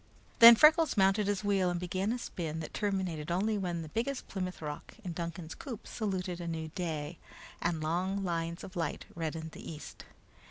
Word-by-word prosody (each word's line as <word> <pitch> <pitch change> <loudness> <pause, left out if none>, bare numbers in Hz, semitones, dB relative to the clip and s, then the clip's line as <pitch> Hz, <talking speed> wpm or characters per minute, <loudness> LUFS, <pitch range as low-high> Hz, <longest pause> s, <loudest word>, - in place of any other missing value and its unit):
Then 235 0 +12
Freckles 310 +2 +6
mounted 195 +1 +4
his 205 0 0
wheel 195 -3 +2
and 175 -1 -1
began 185 +4 -1
a 245 - 0
spin 160 -9 -4
that 155 - -7
terminated 185 -7 -2
only 200 +5 +1
when 175 -4 -2
the 155 - -9
biggest 245 - -2
Plymouth 185 -2 -4
Rock 150 -2 -7
in 180 -3 -4
Duncan's 170 -1 -5
coop 240 -7 -8
saluted 185 -5 -3
a 170 - -5
new 160 -1 -3
day, 160 -2 -4 0.4
and 165 -2 0
long 185 +5 0
lines 170 -2 -2
of 190 - -9
light 165 -4 -2
reddened 160 -1 -4
the - - -8
east. 155 -1 -9
180 Hz, 185 wpm, -32 LUFS, 165-200 Hz, 0.4 s, Then